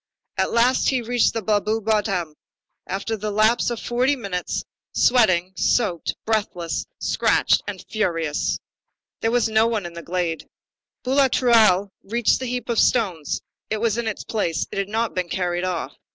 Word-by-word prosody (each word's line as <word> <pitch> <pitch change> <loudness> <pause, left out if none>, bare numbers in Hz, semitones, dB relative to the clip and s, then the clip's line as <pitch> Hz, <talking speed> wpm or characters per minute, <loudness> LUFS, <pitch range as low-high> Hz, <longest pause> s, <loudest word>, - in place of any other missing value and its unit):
At - - 0
last 245 +2 +3
he 260 -3 0
reached 240 +1 +2
the 225 - -2
Blaru 215 +1 +1
bottom, 200 -7 0 0.5
after 200 +4 -2
the 215 0 -4
lapse 215 +4 +3
of 240 -2 -3
forty 250 +4 +1
minutes, 200 -8 -3 0.3
sweating, 185 -7 +3
soaked, 185 -6 +1
breathless, 200 -6 -1
scratched, - - +2
and - - -6
ferocious. 165 -8 -1 0.6
There 225 - 0
was 240 0 +2
no 220 +1 +3
one 220 -5 -1
in 170 - -7
the 170 - -7
glade. 170 -2 -3 0.6
Boulatruelle 235 -7 +4
rushed 235 +3 +1
to - - +1
the 260 - -4
heap 250 0 -3
of 235 -2 +1
stones. 185 - +1 0.3
It 215 - 0
was 225 +1 0
in 235 - -2
its 215 - -3
place. 185 -7 -1
It - - -3
had 195 0 -2
not 225 +1 -1
been 180 -1 -2
carried 175 0 -1
off. 180 -2 -3
215 Hz, 165 wpm, -23 LUFS, 180-235 Hz, 0.6 s, Boulatruelle